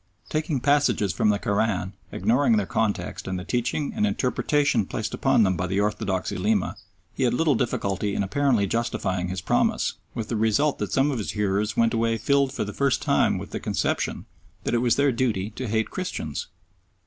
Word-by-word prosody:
Taking 155 -3 -1
passages 145 -8 +2
from 105 - +2
the 105 - +3
Koran, 100 -2 0 0.2
ignoring 115 +4 +2
their 105 - +1
context 105 -1 -2
and 95 -1 -2
the 90 - -5
teaching 125 - -1
and 215 -1 +2
interpretation 140 - +1
placed 110 0 -4
upon 135 -4 +3
them 95 -2 +2
by 90 +2 -2
the 95 +2 0
orthodox 100 -2 -1
Ulema, 100 +1 0 0.4
he - - -6
had 125 -2 +2
little 160 +1 +3
difficulty 100 -5 -1
in - - +1
apparently 120 0 +2
justifying 95 -4 -1
his 90 0 -4
promise, - - +1 0.2
with 110 -2 -4
the 115 - -1
result 110 +7 +2
that - - -3
some 135 +2 +2
of 130 - -2
his 105 - -3
hearers 105 0 0
went 115 0 +3
away 115 0 +1
filled 140 +2 +2
for - - -2
the 105 0 -6
first 140 -2 +1
time - - +2
with - - -7
the - - -3
conception - - -1 0.4
that - - -2
it 120 - +3
was 120 -1 +3
their 140 0 +3
duty 115 -5 -1
to 125 +3 -5
hate 110 +1 0
Christians. 180 - -4
110 Hz, 195 wpm, -25 LUFS, 100-135 Hz, 0.4 s, the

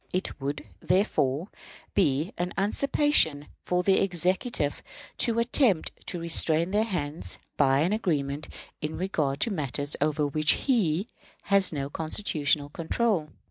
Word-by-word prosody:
It 185 -5 -3
would, 140 -1 -4
therefore, 180 - +1 0.4
be 150 0 +1
a 175 - -1
usurpation 205 - +2 0.2
for 180 0 0
the 190 +1 +4
Executive 180 - 0 0.4
to 230 -1 +3
attempt 235 - +2 0.2
to 175 - -2
restrain 165 +1 +2
their 210 +2 +2
hands 165 -7 -4 0.2
by 135 -1 +3
an 175 +6 +1
agreement 150 -8 -2 0.3
in 155 +1 -4
regard 155 -7 -1
to 230 - +2
matters 145 -4 +1
over 150 0 +1
which 155 +1 +3
he 200 - 0 0.4
has 200 -2 +2
no 140 -3 -3
constitutional 155 -4 0
control. 165 +1 -1
165 Hz, 130 wpm, -27 LUFS, 145-195 Hz, 0.4 s, the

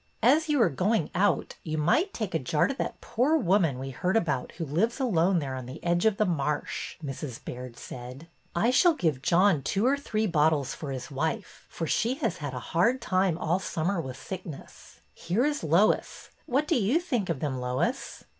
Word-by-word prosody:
'' - - -36
As 315 +1 0
you 295 -2 +3
are - - +3
going 185 - 0
out, 200 +3 +1
you 155 -2 -4
might 235 - +2
take 215 - -4
a 160 - +1
jar 150 +4 +1
to 275 - -1
that 275 - -4
poor 275 +7 +2
woman 180 - +2
we 135 +1 -5
heard 180 - 0
about 150 - -1
who 165 - -4
lives 185 - 0
alone 190 -7 +2
there 140 -5 -2
on 130 -2 -6
the 130 - -9
edge 175 +3 +2
of 210 -2 +1
the 215 - +3
marsh," 150 -4 -2
Mrs. 135 -3 -5
Baird 125 -1 -7
said. 125 +5 -9 0.3
I 225 +8 +3
shall 335 +5 +5
give 155 - 0
John 175 0 +4
two 195 - 0
or 270 +2 +4
three 220 -6 -1
bottles 155 -5 +2
for 150 - -7
his 135 +4 -5
wife, 160 +9 -3
for 165 - -4
she 235 +10 +1
has 270 - -2
had 145 -5 -5
a - - -3
hard 235 +10 +3
time 185 -7 +1
all 175 +2 0
summer 175 0 -1
with 130 -3 -7
sickness. 170 -5 -9
Here 205 +10 0
is 295 -1 -1
Lois. 170 +7 +1 0.2
What 280 +4 +1
do 330 - +2
you 240 +8 +2
think 245 - -2
of 165 -5 -1
them, 135 -3 -2
Lois 125 - -2
175 Hz, 205 wpm, -28 LUFS, 145-225 Hz, 0.3 s, shall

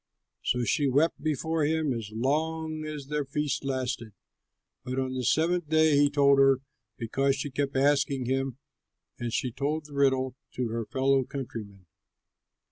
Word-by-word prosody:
So 125 0 +1
she 140 +4 +2
wept 145 +6 +2
before 155 +1 0
him 155 -2 +1
as 115 -3 -5
long 155 +6 -1
as 150 -2 -6
their 150 +1 -1
feast 140 0 -2
lasted, 130 -5 -3 0.7
but 130 +1 -4
on 130 -1 -1
the 130 -1 -2
seventh 165 +5 +1
day 155 -1 +4
he 145 0 +5
told 140 -1 +4
her, 135 -1 +5 0.4
because 135 +4 +1
she 140 +1 -4
kept 140 +1 -2
asking 140 -1 +2
him; 135 0 -1 0.6
and 120 -1 -3
she 125 +2 -1
told 150 +5 -2
the 150 - -12
riddle 130 -2 +2 0.2
to 125 -2 -1
her 115 -1 -3
fellow 135 0 +2
countrymen. 110 -8 -7
135 Hz, 155 wpm, -28 LUFS, 130-150 Hz, 0.7 s, he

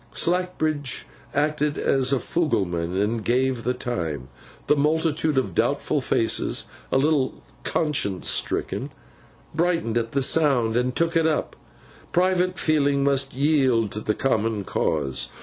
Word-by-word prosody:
Slackbridge 155 -6 0 0.3
acted 150 0 0
as 135 -1 +2
fugleman, 95 - 0
and 110 +2 0
gave 125 0 +1
the 125 +1 0
time. 80 - -4 0.4
The 150 - +3
multitude 155 0 +1
of 120 -9 0
doubtful - - 0
faces - - +1 0.3
(a - - +3
little 145 -1 +1 0.2
conscience 140 - -1
stricken) - - 0 0.6
brightened 165 -8 +1
at 115 0 -5
the 140 -1 +2
sound, 130 -7 +3
and 125 +1 0
took 165 +1 +1
it 165 -1 +3
up. 155 - -1 0.6
Private 185 0 +2
feeling 145 -4 +2
must 135 -1 +1
yield 130 -7 +2
to 105 - -3
the 105 0 -1
common 110 -5 0
cause. 70 -7 -1
135 Hz, 130 wpm, -24 LUFS, 115-155 Hz, 0.6 s, The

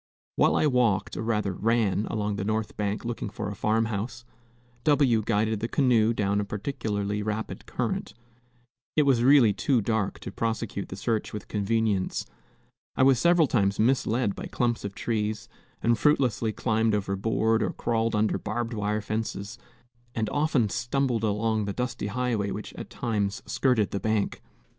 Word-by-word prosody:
While - - +3
I - - +3
walked, 125 -8 +2
or - - -3
rather 105 -4 0
ran, 110 0 +1
along 105 -1 -2
the 95 - -2
north 110 +1 -2
bank 105 +2 -2
looking 120 -3 -3
for 105 0 -5
a - - -6
farm 110 +2 +1
house, 115 +3 -4 0.6
W 140 -7 +4
guided 110 0 0
the 115 - -2
canoe 120 -4 +3
down 100 -2 0
a - - -1
particularly 105 -1 -3
rapid 110 +1 -4
current. - - -3 0.8
It 150 - +5
was 135 -4 +3
really 130 -5 +6
too 130 +4 +1
dark 110 -2 -1
to - - -6
prosecute 110 -2 -3
the - - -6
search 110 +2 -2
with 105 - -6
convenience. 105 -2 0 0.7
I - - +3
was 130 -2 +5
several 170 0 +5
times 100 -7 +1
misled 120 -2 +2
by - - -6
clumps 120 -2 -1
of 100 -1 -5
trees, 110 0 -2 0.4
and 115 +1 +4
fruitlessly 120 -6 +2
climbed 110 0 +1
over 100 -1 -1
board 110 +2 +1
or - - +1
crawled 115 -1 -1
under 105 0 +1
barbed 115 +3 -3
wire 105 0 -1
fences, 110 +1 -4 0.6
and 110 -2 -1
often 145 -6 +2
stumbled 120 0 0
along 110 0 0
the 100 - -3
dusty 125 -3 -3
highway 115 -2 -1
which 105 +1 -6
at - - -8
times 105 -4 -2
skirted 125 -6 +1
the 100 - -2
bank. 110 +1 -1
110 Hz, 165 wpm, -27 LUFS, 105-120 Hz, 0.8 s, really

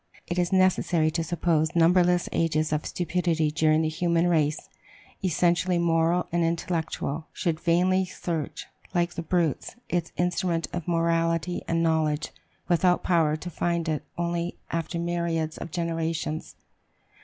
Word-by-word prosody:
It 175 +1 -2
is 175 -1 +1
necessary 185 -4 +3
to 165 +1 -1
suppose 165 0 0
numberless 175 +1 +4
ages 155 -1 +1
of 150 - -1
stupidity 165 -2 0
during 155 0 +3
which 155 0 -1
the - - -10
human 170 -1 +2
race, 155 -3 +1 0.6
essentially 175 0 +2
moral 170 +1 +2
and 170 0 +1
intellectual, 165 -2 -2
should 165 -3 -1
vainly 185 +3 +2
search, 170 -4 -4 0.3
like 175 0 +1
the - - -4
brutes, 170 -1 -1
its 175 -1 -1
instrument 175 -1 0
of 175 -1 -4
morality 165 0 +1
and 165 0 +1
knowledge, 155 -2 +1 0.4
without 180 +1 +3
power 160 -4 +2
to 175 +3 -6
find 170 0 -1
it 155 -2 -1 0.2
only 170 0 -2
after 165 +1 -2
myriads 170 -2 -1
of - - -6
generations. 165 -1 -3
170 Hz, 140 wpm, -26 LUFS, 160-175 Hz, 0.6 s, numberless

